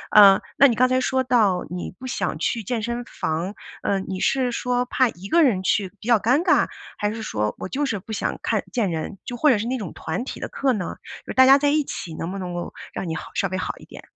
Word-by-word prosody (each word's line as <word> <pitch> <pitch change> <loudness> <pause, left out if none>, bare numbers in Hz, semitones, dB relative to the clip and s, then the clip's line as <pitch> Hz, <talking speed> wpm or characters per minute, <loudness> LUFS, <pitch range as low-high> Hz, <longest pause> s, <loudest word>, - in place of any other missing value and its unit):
嗯， 200 -2 +9 0.2
那 275 - +8
你 240 - +1
刚 255 +3 +4
才 255 0 +2
说 260 +1 +1
到， 215 -8 +3
你 180 +1 -5
不 260 - -7
想 255 - -2
去 230 -2 -1
健 230 +2 -2
身 235 +2 -3
房， 165 +2 -3 0.3
嗯， 195 -1 0
你 190 -1 -4
是 260 -2 +2
说 245 +1 0
怕 255 0 +2
一 190 -2 -9
个 340 +10 +4
人 225 -10 +3
去 195 0 +1
比 215 - -10
较 235 -3 +5
尴 250 +9 +3
尬， - - +4 0.3
还 210 0 -1
是 225 - -6
说， 105 - -1
我 - - -5
就 285 +9 -1
是 240 -7 -2
不 220 +4 -8
想 - - -2
看 - - 0
见 230 -6 0
人， 165 +5 -4
就 245 - -5
或 300 +5 +3
者 250 - +5
是 210 - -3
那 260 +2 -1
种 200 -9 -6
团 160 +8 -4
体 - - -7
的 - - -4
课 275 -1 0
呢？ 200 -6 -3 0.3
就 - - -6
是 - - -4
大 260 - +8
家 270 +1 +8
在 290 0 +2
一 300 +1 +2
起 170 - -6
能 165 +3 -4
不 195 - -5
能 180 -2 -5
够 175 0 -5 0.2
让 185 - -4
你 160 - -2
好 - - -7
稍 195 - +1
微 185 0 -3
好 - - -2
一 - - -14
点？ - - -12
220 Hz, 290 characters per minute, -23 LUFS, 190-255 Hz, 0.3 s, 嗯